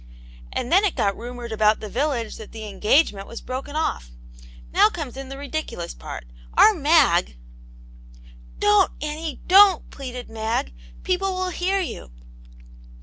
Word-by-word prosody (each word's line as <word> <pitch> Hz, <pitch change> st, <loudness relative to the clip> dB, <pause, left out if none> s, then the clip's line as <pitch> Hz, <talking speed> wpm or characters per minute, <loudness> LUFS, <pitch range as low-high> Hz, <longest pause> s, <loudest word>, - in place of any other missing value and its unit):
And 245 Hz, -, -3 dB
then 380 Hz, +4 st, +5 dB
it 405 Hz, -, +1 dB
got 200 Hz, -1 st, +1 dB
rumoured 240 Hz, 0 st, -8 dB
about 215 Hz, 0 st, +3 dB
the 215 Hz, -, -6 dB
village 245 Hz, -1 st, -2 dB
that 220 Hz, -, -11 dB
the 220 Hz, -1 st, -7 dB
engage 210 Hz, +10 st, +3 dB
nfient 195 Hz, -1 st, -9 dB
was 230 Hz, -, -8 dB
broken 270 Hz, +3 st, -6 dB
off. 185 Hz, -, -2 dB, 0.6 s
Now -, -, +6 dB
comes 290 Hz, -5 st, -6 dB
in 270 Hz, 0 st, -7 dB
the 270 Hz, -, -7 dB
ridiculous 280 Hz, -, -5 dB
part. -, -, -8 dB, 0.3 s
Our 435 Hz, -, +8 dB
Mag 290 Hz, -, +3 dB, 0.6 s
" -, -, -21 dB
"Don*t, 210 Hz, 0 st, +3 dB
Annie, 305 Hz, -1 st, -5 dB
don't/' 385 Hz, -1 st, +6 dB
pleaded 250 Hz, -3 st, -7 dB
Mag. 220 Hz, -, -2 dB, 0.3 s
"People 375 Hz, +1 st, 0 dB
will 370 Hz, 0 st, -1 dB
hear 380 Hz, +3 st, 0 dB
you 335 Hz, -, -6 dB
250 Hz, 150 wpm, -23 LUFS, 210-315 Hz, 0.6 s, Our